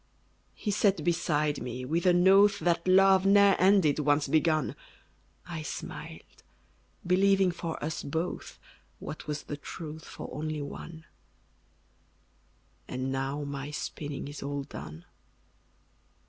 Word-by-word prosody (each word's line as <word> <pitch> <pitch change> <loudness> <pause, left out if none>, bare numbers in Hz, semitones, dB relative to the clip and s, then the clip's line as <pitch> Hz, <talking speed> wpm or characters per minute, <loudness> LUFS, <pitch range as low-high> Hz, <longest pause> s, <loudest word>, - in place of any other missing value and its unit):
He 210 - -3
sat 195 -4 +2
beside 155 -3 0
me, 125 +1 -5
with 165 +6 0
an 175 +1 +5
oath 200 +1 +6
That 170 0 0
love 190 0 +6
ne'er 200 0 +6
ended, 185 -6 +4
once 145 0 +2
begun; 155 +1 +1 0.7
I 170 -3 -5
smiled, 150 - -8 0.6
believing 190 +1 +4
for 170 -1 -5
us 155 +1 -3
both, 160 +5 -4 0.4
What 155 - -8
was 150 -1 -3
the 145 - -6
truth 155 +1 -8
for - - -8
only 155 -1 -3
one: 160 +3 -9 1.8
And 130 +1 -3
now 135 +2 -2
my 140 0 -5
spinning 145 -1 -5
is 145 0 -8
all 140 0 -3
done. 80 - -9
160 Hz, 120 wpm, -29 LUFS, 145-185 Hz, 1.8 s, oath